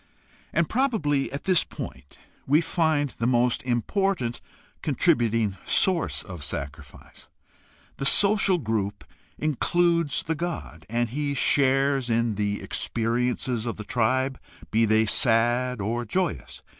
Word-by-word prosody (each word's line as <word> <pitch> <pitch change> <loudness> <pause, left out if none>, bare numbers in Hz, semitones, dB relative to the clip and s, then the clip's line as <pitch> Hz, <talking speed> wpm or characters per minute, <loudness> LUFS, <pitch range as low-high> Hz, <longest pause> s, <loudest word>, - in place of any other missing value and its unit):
Probably 215 - 0
at 140 +2 -5
this 185 -3 +3
point 65 +2 -9 0.3
we 145 +3 +5
find 160 -5 0
the 115 +2 -2
most 125 -1 +2
important 125 - -1 0.4
contributing 115 -4 +1
source 185 -3 +1
of 90 -6 -8
sacrifice. 70 +1 -8 0.7
The 135 - +1
social 200 +1 +4
group 110 - -2 0.3
includes 170 +1 +1
the 160 - -1
god, 145 - -5
and 120 +1 0
he 140 +3 -2
shares 135 -2 +2
in 115 -1 +1
the 105 0 -2
experiences 120 0 -1
of 115 - -3
the 105 - -6
tribe, 130 +4 0 0.3
be 115 +1 +3
they 110 +1 +3
sad 120 +2 +2
or 115 +4 -2
joyous. 115 - -3
125 Hz, 120 wpm, -25 LUFS, 110-150 Hz, 0.7 s, we